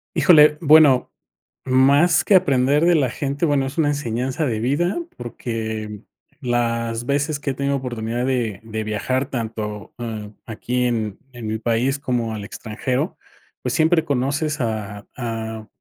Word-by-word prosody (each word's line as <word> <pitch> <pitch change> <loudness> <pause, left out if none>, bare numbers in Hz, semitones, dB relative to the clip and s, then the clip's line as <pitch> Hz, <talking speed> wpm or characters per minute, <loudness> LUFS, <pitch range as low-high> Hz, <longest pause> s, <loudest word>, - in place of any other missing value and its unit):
Híjole, 150 -3 +6
bueno, 150 -4 +6 0.5
más 135 +6 +4
que 205 - +3
aprender 140 -3 +4
de 175 0 +5
la 145 -5 +2
gente, 140 +5 -2
bueno, 145 -3 +2
es 135 +4 -7
una 155 -2 +3
enseñanza 130 0 -2
de 110 -4 -1
vida, 145 - 0 0.2
porque 110 -3 -5 0.4
las 115 -1 -1
veces 145 +2 0
que 145 - -2
he 135 - -2
tenido 140 +1 0
oportunidad 120 -2 -3
de 120 -7 -1
de 110 -1 -4
viajar 130 +6 -1
tanto, 110 -4 -5
ah, 110 -3 -5
aquí 125 +2 -2
en 110 -4 -1
en 120 -3 -8
mi 110 +1 -2
país 120 +5 0
como 120 -5 -2
al 105 -2 -6
extranjero, 125 - -3 0.5
pues, - - -2
siempre 160 0 +3
conoces 145 +3 -1
a 105 -4 -3
a 110 -2 -5
125 Hz, 150 wpm, -21 LUFS, 110-140 Hz, 0.5 s, Híjole